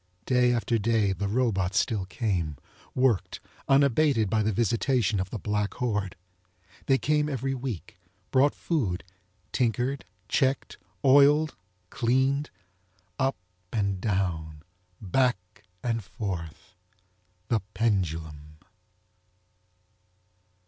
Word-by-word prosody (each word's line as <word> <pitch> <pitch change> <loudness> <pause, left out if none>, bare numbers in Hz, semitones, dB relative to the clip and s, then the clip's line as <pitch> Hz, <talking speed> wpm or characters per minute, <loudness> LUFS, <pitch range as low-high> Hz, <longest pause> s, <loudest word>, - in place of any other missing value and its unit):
Day 125 -1 +3
after 115 -1 +1
day 105 -2 +2
the 100 +1 -3
robots 100 -5 +1
still 105 -2 +1
came, 95 - -2 0.4
worked, 125 -6 +1 0.3
unabated 135 -5 +3
by 110 - +3
the 110 +1 +1
visitation 115 0 +1
of 95 0 -2
the 115 - -4
black 105 0 -2
horde. 105 -6 -1 0.7
They 135 - +5
came 150 +1 +1
every 135 -1 -2
week, 125 -9 -6 0.3
brot 140 +2 +4
food, 115 - -1 0.5
tinkered, 125 +3 0 0.2
checked, 135 0 0 0.3
oiled, 145 +3 +5 0.4
cleaned. 130 +4 +1 0.7
Up 135 -5 +1 0.3
and 100 -4 -1
down, 85 -7 -2 0.4
back 100 -3 -1 0.2
and 115 -2 -1
forth—THE 90 +1 -6 0.2
PENDULUM! 80 -8 -1
110 Hz, 95 wpm, -27 LUFS, 95-130 Hz, 0.7 s, They